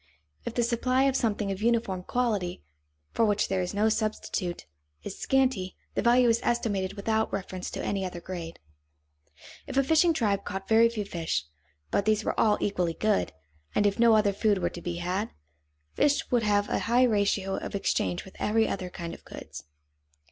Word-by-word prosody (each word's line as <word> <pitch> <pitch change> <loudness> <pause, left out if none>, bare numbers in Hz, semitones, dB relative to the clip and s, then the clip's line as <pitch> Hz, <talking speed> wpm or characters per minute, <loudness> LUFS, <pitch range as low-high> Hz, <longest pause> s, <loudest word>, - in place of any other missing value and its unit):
If - - -4
the 240 - +2
supply 255 +3 +1
of 275 -1 +2
something 210 -5 0
of 195 +1 -5
uniform 225 -5 +1
quality, 205 - -1 0.5
for - - +1
which 210 -1 +2
there 190 -1 +1
is 180 - -2
no 210 +2 +3
substitute, 215 - -2 0.4
is - - -7
scanty, 255 -9 +1 0.2
the - - 0
value 245 +1 +5
is 230 0 +3
estimated 205 -5 0
without 220 +2 0
reference 185 -1 -4
to - - -5
any 195 -1 -1
other 180 -2 -5
grade. 170 -2 -7 1.1
If 270 - -4
a 275 - +5
fishing 320 +5 +4
tribe 210 -10 0
caught 195 -1 -5
very 225 +1 +5
few 215 -3 -4
fish, 165 - -2 0.5
but 200 - +1
these 215 0 +2
were - - -2
all 210 -2 +4
equally 180 -5 -1
good, 215 - +1 0.4
and 205 - +3
if 200 +2 +1
no 230 -1 +6
other 210 -2 +3
food 205 0 +2
were - - -1
to 175 - -8
be 175 0 -3
had, 180 +5 -2 0.6
fish 290 0 +1
would 245 -2 +3
have 205 -1 +2
a - - 0
high 245 +2 +5
ratio 200 -4 +1
of - - -5
exchange 95 - -1
with 190 - -14
every 220 +1 +2
other 185 -2 -3
kind 170 -2 -6
of - - -12
goods. - - -10
205 Hz, 185 wpm, -28 LUFS, 190-230 Hz, 1.1 s, no